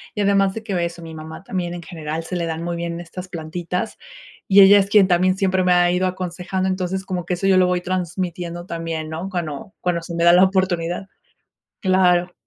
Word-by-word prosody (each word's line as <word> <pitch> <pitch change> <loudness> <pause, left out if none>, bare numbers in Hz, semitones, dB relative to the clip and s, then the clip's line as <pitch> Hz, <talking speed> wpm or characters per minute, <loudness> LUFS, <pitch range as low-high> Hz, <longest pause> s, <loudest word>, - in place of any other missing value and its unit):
y 210 - -1
además 195 -1 +2
de 225 - -6
que 190 -6 -1
eso, 170 0 -5
mi 165 -1 -9
mamá 160 +3 -9
también 175 -3 -3
en 175 - -8
general 160 -2 -5
se 180 - -5
le 170 -1 -1
dan 165 0 -4
muy 170 0 -3
bien 170 0 -4
estas 180 +2 -8
plantitas, 175 +3 -4 0.5
y 200 0 +7
ella 200 +1 +8
es 195 0 0
quien 200 -2 +6
también 185 +1 +2
siempre 190 -1 +1
me 180 0 +4
ha 175 0 +4
ido 180 +1 +1
aconsejando. 185 +1 -3
Entonces, 190 0 -2
como 180 -3 -3
que 180 - 0
eso 180 - -4
yo 190 -1 +5
lo 185 -1 +5
voy 180 0 0
transmitiendo 175 -1 -3
también, 165 -2 -4
¿no?, 165 +4 -4
cuando, 170 -1 -5
cuando 175 -1 0
se 170 0 -7
me 170 - 0
da 170 0 +7
la 180 +2 +7
oportunidad, 185 -1 -1 0.8
claro. 180 -2 +3
180 Hz, 215 wpm, -21 LUFS, 170-190 Hz, 0.8 s, ella